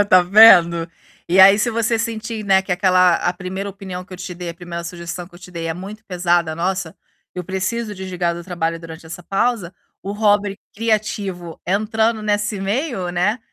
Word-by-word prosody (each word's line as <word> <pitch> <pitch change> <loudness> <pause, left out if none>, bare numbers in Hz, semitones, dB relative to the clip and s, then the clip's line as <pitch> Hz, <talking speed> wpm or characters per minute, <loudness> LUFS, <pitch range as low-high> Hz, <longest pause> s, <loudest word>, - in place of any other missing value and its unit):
Está 185 -3 +5
vendo? 175 -4 +7 0.4
E 185 +2 +5
aí 195 +2 +8
se 235 +2 +1
você 230 0 0
sentir, 225 -1 -4
né, 190 -1 +4
que 190 - -11
aquela 185 -1 +4
a 175 - -1
1ª 190 +2 -5
opinião 190 -2 -7
que 190 - -16
eu - - -7
te 180 0 -7
dei, 175 0 -6
a 170 - -9
1ª 170 -1 -7
sugestão 175 0 -6
que 175 - -20
eu - - -12
te 180 0 -13
dei 170 -2 -5
é 165 - -2
muito 205 +5 -9
pesada, 175 -3 0
"Nossa, 180 0 -2 0.4
eu 180 - -4
preciso 205 +4 -3
desligar 180 -3 -2
do 170 - -8
trabalho 165 -2 -2
durante 165 0 -11
essa 170 +2 -8
pausa", 195 -1 -1 0.3
o 200 - -4
hobby 205 -1 +1 0.2
criativo 205 -6 -2
entrando 220 +3 0
nesse 210 -1 -1
meio, 205 - -2
né, 185 +6 0
190 Hz, 190 wpm, -20 LUFS, 175-210 Hz, 0.4 s, aí